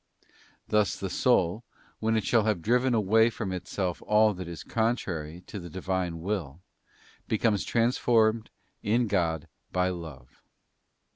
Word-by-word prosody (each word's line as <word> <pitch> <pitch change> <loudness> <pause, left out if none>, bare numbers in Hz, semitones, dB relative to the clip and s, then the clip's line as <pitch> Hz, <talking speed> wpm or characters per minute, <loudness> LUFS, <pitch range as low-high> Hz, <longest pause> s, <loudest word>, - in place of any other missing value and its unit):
Thus 105 -1 +2
the 95 -2 -4
soul, 110 -3 +2 0.4
when 110 0 +1
it 110 - 0
shall 115 -3 +3
have 105 -7 0
driven 125 +2 +2
away 110 +2 +4
from 105 -4 -4
itself 90 0 -3
all 105 0 +5
that 90 -2 -7
is 85 -1 -7
contrary 90 -8 -2
to 105 - -7
the 85 -1 -8
divine 95 -1 -2
will, 85 -6 -3 0.7
becomes 110 -2 +1
transformed 115 -2 +2 0.3
in 115 +4 +2
God 85 -6 0 0.2
by 90 0 +1
love. 80 -9 -9
100 Hz, 135 wpm, -28 LUFS, 90-110 Hz, 0.7 s, all